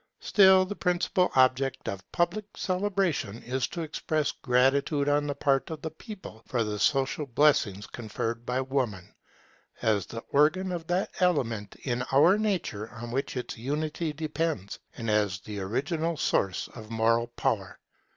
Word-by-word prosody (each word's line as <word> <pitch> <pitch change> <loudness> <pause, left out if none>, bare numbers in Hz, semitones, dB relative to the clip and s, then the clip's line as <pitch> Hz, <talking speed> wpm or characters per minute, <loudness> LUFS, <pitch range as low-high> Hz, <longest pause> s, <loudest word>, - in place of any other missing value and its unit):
Still 190 -2 +6
the 205 +2 -5
principal 180 0 +1
object 130 0 +2
of 100 0 -6
public 195 +5 -1
celebration 185 - -1
is 125 +1 -1
to 170 - -5
express 155 -1 -1
gratitude 140 +3 +2
on 145 0 +2
the 145 - -2
part 140 -2 +1
of 160 -2 -6
the 160 - -3
people 190 - -10
for 120 -3 0
the 105 -1 -3
social 135 +3 +1
blessings 115 -7 +2
conferred 115 0 -4
by 125 +2 -1
Woman, 130 -9 -2 0.7
as 105 -4 +2
the 115 - -6
organ 155 +6 +3
of 170 -2 -4
that 180 +2 0
element 120 - 0
in 125 -2 -1
our 170 +9 +6
nature 170 - -1
on 120 0 -7
which 135 +1 -2
its 125 -2 -5
unity 150 +5 -2
depends, 155 - -3 0.2
and 115 - -5
as 105 -3 +1
the 105 -1 -6
original 150 - -1
source 95 -8 0
of 110 -2 -11
moral 115 +1 +2
power. 120 - -2
135 Hz, 150 wpm, -28 LUFS, 115-165 Hz, 0.7 s, Still